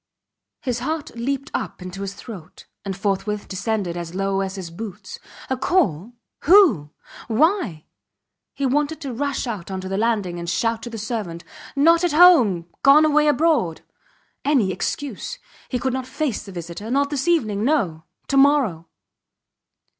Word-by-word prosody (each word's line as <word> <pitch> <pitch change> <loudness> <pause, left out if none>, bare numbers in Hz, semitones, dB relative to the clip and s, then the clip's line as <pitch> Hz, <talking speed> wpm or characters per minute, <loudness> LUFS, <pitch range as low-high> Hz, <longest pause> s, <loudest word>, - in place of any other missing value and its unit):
His 250 -4 -1
heart 305 +4 -3
leaped 275 +4 -3
up - - -3
into 185 +1 -7
his 200 0 -5
throat, 200 -6 -11 0.2
and 195 -1 -4
forthwith 205 +1 -2
descended 190 -2 -2
as 170 0 -6
low 195 0 0
as 190 0 -3
his 180 -4 -7
boots. 200 +2 -8 0.3
A 260 - 0
call! 245 - 0 0.3
Who? 300 - +6 0.4
Why? 245 - +1 0.7
He 280 - -1
wanted 295 +4 0
to 275 -4 -4
rush 280 +3 -2
out 210 -8 -5
on 190 -1 -4
the 190 +1 -3
landing 205 -6 0
and 170 0 -4
shout 225 +6 0
to 240 - -6
the 230 - -7
servant: 205 -6 -4 0.3
Not 330 +4 +5
at 350 -4 +1
home! 260 - +6 0.2
Gone 290 +3 +7
away 300 0 +3
abroad!... 295 - +2 0.6
Any 260 -10 +2
excuse. 285 - -4 0.3
He 255 - -1
could 260 +1 -1
not 260 -1 -3
face 260 -6 -3
a - - -8
visitor. 175 +4 -7
Not 280 +3 +1
this 290 +2 -2
evening. 215 -12 +1
No. 190 - 0 0.2
To 275 - +2
morrow. 270 - +3
230 Hz, 155 wpm, -22 LUFS, 190-285 Hz, 0.7 s, Gone